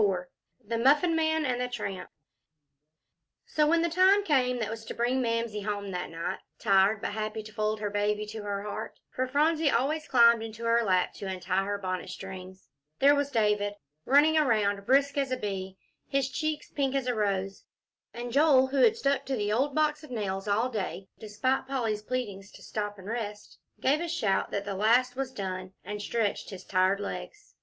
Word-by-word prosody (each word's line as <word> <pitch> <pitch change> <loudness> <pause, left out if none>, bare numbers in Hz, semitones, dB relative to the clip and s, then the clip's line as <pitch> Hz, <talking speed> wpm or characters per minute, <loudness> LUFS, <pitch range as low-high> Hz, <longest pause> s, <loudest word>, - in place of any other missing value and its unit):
IV 185 -3 +1 0.4
THE 230 +2 -2
MUFFIN 295 +7 +4
MAN 315 -1 +1
AND 250 -2 -1
THE 250 - 0
TRAMP 200 -6 -5 1.4
So 300 -1 +2
when 335 +1 +3
the - - +2
time 375 +4 +5
came 255 -7 +2
that 220 -2 -2
was 225 0 -6
to - - -6
bring 245 +2 +1
Mamsie 230 -3 -1
home 200 -1 -3
that 180 -1 -4
night, 165 0 -4 0.2
tired, 195 +2 +3
but - - -1
happy 215 +1 -3
to 215 0 -12
fold 215 0 -1
her 205 -1 -3
baby 210 +1 0
to 215 +1 -7
her 200 -1 -3
heart, 210 +1 -6
for 255 0 -1
Phronsie 305 +3 +2
always 290 +6 0
climbed 235 -2 +6
into 225 +1 -7
her 230 0 +3
lap 185 -3 +1
to 200 - -6
untie 185 0 -1
her 205 0 -2
bonnet 185 -2 -4
strings, 190 0 -9 0.3
there 280 +1 +6
was 285 -1 0
David, 210 -4 +1 0.3
running 300 - +5
around 205 -7 +1
brisk 280 +2 +3
as 275 -1 0
a 255 - 0
bee, 190 -3 -4 0.3
his 275 -1 0
cheeks 310 0 -3
pink 275 -2 -1
as 270 -2 0
a 250 - 0
rose, 195 -3 -2 0.5
and 240 0 -6
Joel, 280 -2 +5
who 275 - -2
had 445 - +5
stuck 280 -9 +1
to 270 - 0
the 210 -2 -1
old 270 +5 0
box 305 0 +1
of 305 - -11
nails 200 -4 -3
all 220 +5 +1
day, 195 -4 -4
despite 240 +6 -1
Polly's 230 -6 -1
pleadings 210 -5 -4
to - - -14
stop 205 -1 -4
and 190 - -12
rest, 210 -2 -5 0.2
gave 290 +4 +2
a 345 - -2
shout 215 - 0
that 200 0 -3
the 200 - -3
last 240 +6 +3
was 265 0 -3
done, 185 -4 -5
and 210 0 -5
stretched 215 0 -1
his 190 -2 -8
tired 185 +1 +2
legs. 415 - -7
225 Hz, 195 wpm, -28 LUFS, 205-270 Hz, 1.4 s, climbed